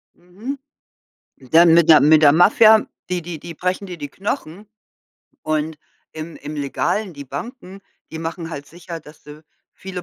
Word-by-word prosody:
Mhm. 210 +11 -8 0.8
Dann 160 +6 +4
mit 170 -1 +4
der 155 - +8
mit 155 +1 +5
der 145 -2 +7
Mafia, 215 +5 +6 0.2
die 180 -1 -2
die 165 -2 -7
die 170 +1 -9
brechen 185 +4 -3
dir 175 -2 -8
die 145 -2 -7
Knochen 195 +1 -5 0.8
und 155 0 -2 0.4
im 160 +1 -8
im 150 +1 -8
Legalen, 180 +7 -2
die 140 0 -9
Banken, 195 - -8 0.3
die 160 - -7
machen 165 +1 -5
halt 145 -2 -7
sicher, 170 -1 -9
dass 150 0 -17
du 150 +1 -13 0.3
viele 185 -2 -8
165 Hz, 160 wpm, -20 LUFS, 155-185 Hz, 0.8 s, der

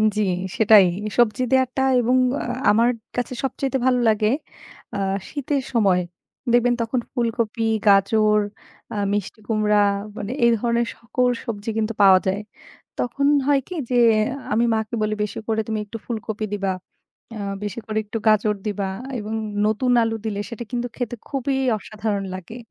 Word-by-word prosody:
জি 215 - +1 0.4
সেটাই 215 -3 +7 0.3
সবজি 240 +1 +3
দেয়াটা 260 0 +2 0.2
এবং 245 +2 +2 0.2
আ - - -3 0.3
আমার 230 +3 +4 0.3
কাছে 245 +1 -2
সবচাইতে 270 0 -1
ভালো 255 -1 +3
লাগে 215 -1 +2 0.7
আ - - -1 0.3
শীতের 285 -1 -2
সময়। 195 -6 +3 0.5
দেখবেন 240 0 +4
তখন 230 +2 0
ফুলকপি, 230 -2 -1 0.2
গাজর, 210 +2 +4 0.5
আ - - -4 0.2
মিষ্টি 205 +2 -3
কুমড়া 210 -2 +3 0.4
মানে 205 - -4
এই 235 - +6
ধরনের 235 +1 +1
সকল 250 +2 0 0.2
সবজি 220 -2 -4
কিন্তু 220 0 0
পাওয়া 190 -2 +8
যায়। 195 +2 0 0.6
তখন 275 +4 0 0.2
হয় 285 -1 +4
কি 365 - -6
যে 250 - +1 0.6
আমি 230 +2 +3
মাকে 220 +1 -3
বলি 215 0 0
বেশি 210 - -4
করে 220 -1 +1
তুমি 220 -1 -1
একটু 210 +2 -7
ফুলকপি 220 -2 -4
দিবা 195 -2 -1 0.6
আ - - -6 0.3
বেশি 205 +2 -4
করে 215 0 -3
একটু 210 +2 -4
গাজর 215 0 +4
দিবা 200 -2 -2 0.3
এবং 215 +1 -5 0.3
নতুন 220 +4 +1
আলু 225 0 0
দিলে 205 -2 -2
সেটা 235 -1 -6
কিন্তু 245 -1 -2
খেতে 245 -1 -3
খুবই 275 -1 -1 0.2
অসাধারণ 210 -1 -3
লাগে। 185 +5 -9
220 Hz, 155 wpm, -22 LUFS, 210-245 Hz, 0.7 s, পাওয়া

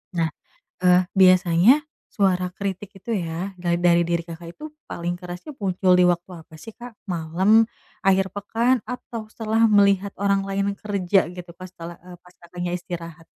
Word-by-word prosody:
Nah, 165 -1 +1 0.6
e 180 0 +5
biasanya 185 - +5 0.4
suara 185 -3 +2
kritik 200 0 -5
itu 235 - -7
ya, 175 +2 -4
ga 175 -1 0
dari 175 0 +4
diri 170 0 0
Kakak 170 0 -9
itu 305 0 -8 0.2
paling 175 +1 -3
kerasnya 180 - -8
muncul 185 -2 +1
di 180 - +6
waktu 175 +1 0
apa 160 - -18
sih 225 - -9
Kak? 245 -1 -11 0.2
Malam, 185 +7 +3 0.4
akhir 190 -1 +3
pekan 230 +5 +1
atau 230 -2 -6
setelah 225 0 +2
melihat 200 -2 +3
orang 200 -1 +1
lain 200 0 -1
kerja 195 -3 +1
gitu 180 -1 -10
pas 185 -1 -10
tela 170 0 -9
e 180 0 -12
pas 180 0 -20
Kakaknya 175 0 -6
istirahat? 170 -2 -8
185 Hz, 160 wpm, -23 LUFS, 175-200 Hz, 0.6 s, di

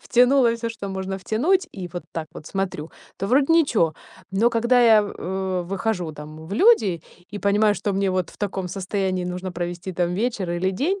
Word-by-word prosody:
втянула 250 0 +4
всё, 230 0 -3
что 220 -3 -6
можно 190 0 -4
втянуть, 325 - +1
и 180 - -5
вот 175 - -5
так 160 -2 -4
вот 150 - -10
смотрю, 185 -5 -3 0.3
то 195 - -2
вроде 270 +7 +3
ничего. 240 - +3 0.4
Но 220 +5 +3
когда 235 +2 +3
я, 225 -3 +6
в, 205 - -4
э, 190 0 -2
выхожу, 185 -4 -2
там, 155 +1 -10
в 180 - -8
люди 215 - +4 0.3
и - - -3
понимаю, 205 +1 +3
что 205 - -2
мне 195 0 +1
вот 185 -1 -1
в - - -18
таком 190 -3 -3
состоянии 190 -1 -2
нужно 180 +1 -4
провести, 175 +1 -4
там, 175 0 0
вечер 210 -2 -1
или 175 +2 0
день, 320 - -1
195 Hz, 195 wpm, -23 LUFS, 180-230 Hz, 0.4 s, я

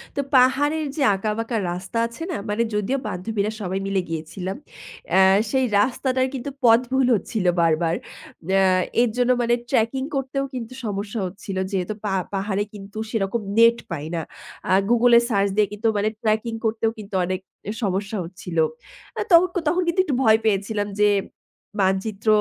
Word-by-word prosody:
তো 280 - +1
পাহাড়ের 285 +5 +3
যে, 310 - -3
আঁকাবাঁকা 225 +4 -2
রাস্তা 185 +6 -5
আছে 235 +7 -9
না? 330 - -2
মানে 210 +3 +1
যদিও 210 +6 0
বান্ধবীরা 205 +3 -2
সবাই 190 0 -2
মিলে 195 -1 +1
গিয়েছিলাম। 170 +4 -5 0.5
অ্যা 190 - +5 0.3
সেই 265 -1 +2
রাস্তাটার 260 +3 +1
কিন্তু 270 +1 -4
পথ 230 -1 +7
ভুল 265 -1 +3
হচ্ছিল 210 -1 -3 0.2
বারবার। 165 0 +2 0.5
অ্যা 195 0 +4 0.4
এর 245 - +3
জন্য 250 0 +3
মানে 240 0 +2 0.2
tracking 265 +2 +1
করতেও 275 0 -1
কিন্তু 245 -1 -6
সমস্যা 205 +1 -3
হচ্ছিল। 190 +1 -6
যেহেতু 190 +1 -1
পা 200 - 0 0.2
পাহাড়ে 195 +1 -1
কিন্তু 205 0 -10
সেরকম 220 0 -1 0.2
নেট 230 +1 +6
পাই 150 -3 -4
না 165 - -1 0.7
Google-এ 240 0 +6
search 200 -3 +2
দিয়ে 210 -1 +3
কিন্তু 210 +2 -1
মানে 205 +1 +1
tracking 225 +1 0
করতেও 225 0 +1
কিন্তু 205 -2 -8
অনেক 185 +1 -2 0.4
সমস্যা 200 +2 -1
হচ্ছিল। 180 0 -8 0.6
আ - - +1
তখন, 350 +2 +7 0.2
তখন 350 +4 +2
কিন্তু 340 +2 0
একটু 280 - -1
ভয় 220 -2 +5
পেয়েছিলাম 205 0 0
যে 210 - +6 0.7
মানচিত্র 195 +3 -1
215 Hz, 155 wpm, -23 LUFS, 195-245 Hz, 0.7 s, পথ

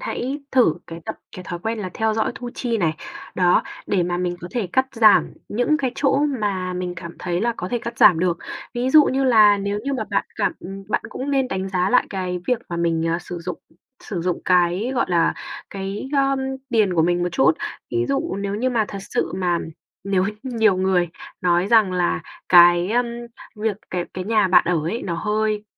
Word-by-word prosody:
hãy 285 - -3
thử 245 -12 +4
cái 165 0 -8
tập - - -5 0.2
cái 185 - -8
thói 175 0 -5
quen 225 +5 -3
là 190 -3 -4
theo 220 -1 0
dõi 220 - 0
thu 245 -1 -6
chi 235 -3 -1
này, 165 -5 +1 0.4
đó, 180 -1 +3 0.2
để 195 -3 +1
mà 175 0 -1
mình 175 0 -2
có 175 - -7
thể 225 -1 -2
cắt 260 0 +3
giảm 220 -4 +5 0.2
những 245 +8 +1
cái 270 -4 -1
chỗ 275 -1 +2 0.2
mà 190 -3 -1
mình 180 0 -4
cảm 170 -1 -9
thấy 175 0 -2
là 235 +2 +1
có 180 - -4
thể 240 - -1
cắt 235 0 -7
giảm 170 - +7
được. 175 0 0 0.4
Ví 245 +2 0
dụ 300 +1 +8
như 270 +1 0
là 215 -5 +6
nếu 200 +1 -2
như 280 - -1
mà 255 - -2
bạn - - +1
cảm - - +1
ừm, 195 +1 -8
bạn - - 0
cũng 270 +2 -5
nên 270 -2 +1
đánh 190 0 -3
giá 185 0 0
lại 250 - +4
cái 180 -2 -3
việc 250 - +2
mà 170 - -4
mình, 165 -1 0
ờ, 170 - 0
sử 175 0 -7
dụng 175 0 -5 0.4
sử 185 -5 -4
dụng 180 0 -1
cái, 180 +5 +2
gọi 250 - +2
là, 170 -2 +2 0.4
cái, 195 +5 -5
ưm, 275 -1 +2 0.3
tiền 215 -6 +2
của 165 - +3
mình 175 +1 +1
một 175 - +1
chút. 265 - +4 0.4
Ví 360 0 0
dụ 275 -3 -1
nếu 200 0 -3
như 250 +5 0
mà 230 -3 +1
thật 200 - -6
sự - - -2
mà 175 -2 +1 0.5
nếu 195 -2 +1
h - - +1 0.2
nhiều 225 -6 +2
người 185 -2 +1 0.3
nói 175 0 +2
rằng 215 -3 +4
là 180 -1 0 0.3
cái, 175 0 +7
ờm, 240 +2 +2 0.5
việc 215 -1 -1
cái 180 -1 -2
cái 185 0 -4
nhà 215 -3 +2
bạn 180 - +5
ở 175 -3 +2
ấy 220 +9 -3
nó 175 - -3
hơi 210 +3 -1
195 Hz, 220 wpm, -22 LUFS, 180-235 Hz, 0.5 s, dụ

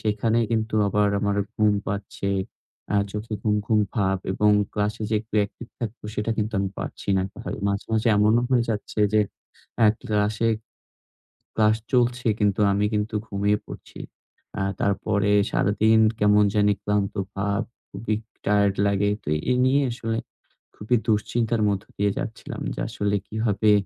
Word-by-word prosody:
সেখানে 110 +2 +1
কিন্তু 110 -1 0
আবার 105 0 +2
আমার 100 -1 0 0.2
ঘুম 105 -1 +4
পাচ্ছে। 100 -1 -3 0.6
আ - - +4 0.2
চোখে 110 +1 -4
ঘুম, 105 -1 +2
ঘুম 110 -2 +3
ভাব। 95 -3 +1
এবং 105 +2 +3 0.2
ক্লাসে 105 +1 -1
যে - - +2
একটু 110 0 -12
অ্যাকটিভ 105 +3 -4
থাকবো, 115 0 -5
সেটা 105 +2 -1
কিন্তু 110 +1 -1
আমি 95 0 0
পারছি - - -7
না - - +2
এককথায়। 100 - -6
মাঝে, 100 0 -1
মাঝে 110 +2 +2
এমনও 110 +3 +4
হয়ে 125 -2 +3
যাচ্ছে 105 0 -3
যে, 110 - +5 0.6
এ - - +7 0.2
ক্লাসে, 105 +2 +1 1.1
ক্লাস 110 0 +4 0.2
চলছে। 120 -1 +2
কিন্তু 105 -1 +2
আমি 100 +1 +1
কিন্তু 105 +1 -1
ঘুমিয়ে 100 +1 +1
পড়ছি। - - -11 0.6
আ - - -1 0.2
তারপরে 100 +1 +1 0.2
সারাদিন 110 +3 +3 0.2
কেমন 105 0 +5
জানি 105 0 +4
ক্লান্ত 105 -1 0 0.2
ভাব। 100 +2 0 0.3
খুবই 110 +2 -2 0.3
টায়ারড 100 -1 +3
লাগে। 100 0 +2
তো - - -5 0.2
এই 125 - +2
নিয়ে 140 +2 +3
আসলে 115 -2 -3 0.6
খুবই 110 +4 0
দুশ্চিন্তার 115 +1 +1
মধ্য 100 0 -1
দিয়ে 100 0 +2
যাচ্ছিলাম। 110 - -5
যে - - -7
আসলে 105 0 -1
কিভাবে 110 -1 +1
105 Hz, 150 wpm, -24 LUFS, 100-110 Hz, 1.1 s, এ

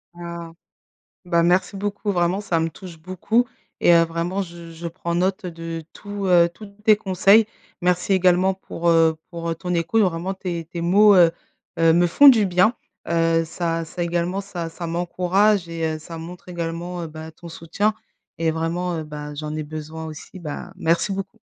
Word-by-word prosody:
Ah. 170 -1 -7 0.8
Bah 170 -1 +3
merci 180 +3 +2
beaucoup, 205 +1 -2
vraiment, 175 +2 +1
ça 180 -5 0
me 165 - 0
touche 175 -1 -11
beaucoup 185 +8 0 0.3
et - - +5
heu, 170 - +6
vraiment 170 +4 -2
je 170 -2 -10
je 170 +1 -6
prends 170 0 -4
note 185 +3 0
de 165 -1 -6
tout, 205 -1 -6
heu, 175 -2 +5
tous 210 +5 -11 0.2
tes 215 -1 +6
conseils. 200 +2 +4 0.4
Merci 180 +2 +1
également 185 +1 +3
pour, 175 -2 -4
heu, 165 -1 +4
pour, 170 -1 -4
heu, - - -1
ton 180 +2 -3
écoute 170 +7 +2
vraiment 180 0 -1
tes 175 -3 -4
tes 170 +1 -7
mots, 200 +4 +6
heu 175 -3 +7 0.5
heu, 165 0 +5
me 175 +1 +4
font 285 +12 +7
du 225 -6 +6
bien, 185 +6 +3 0.3
heu, 165 -1 +2
ça 165 0 -2
ça 175 +2 -5
également, 175 +2 -1
ça, 175 -4 -6
ça 170 +1 -6
m'encourage 180 +3 +1
et 165 -1 -3
heu, - - -9
ça 165 +2 -9
montre 170 +3 -9
également, 175 +1 -4
heu, 165 - -4
bah 160 +1 -9
ton 170 +2 -12
soutien 170 +7 -1 0.5
et 165 0 +1
vraiment, 165 +2 -2
heu, 160 - -4
bah 150 -1 -7
j'en 150 +1 -5
ai 155 - -2
besoin 155 +1 -7
aussi, 155 +4 -10
bah 170 +2 -7
merci 170 +2 +1
beaucoup. 195 +3 -6
170 Hz, 185 wpm, -22 LUFS, 165-185 Hz, 0.8 s, heu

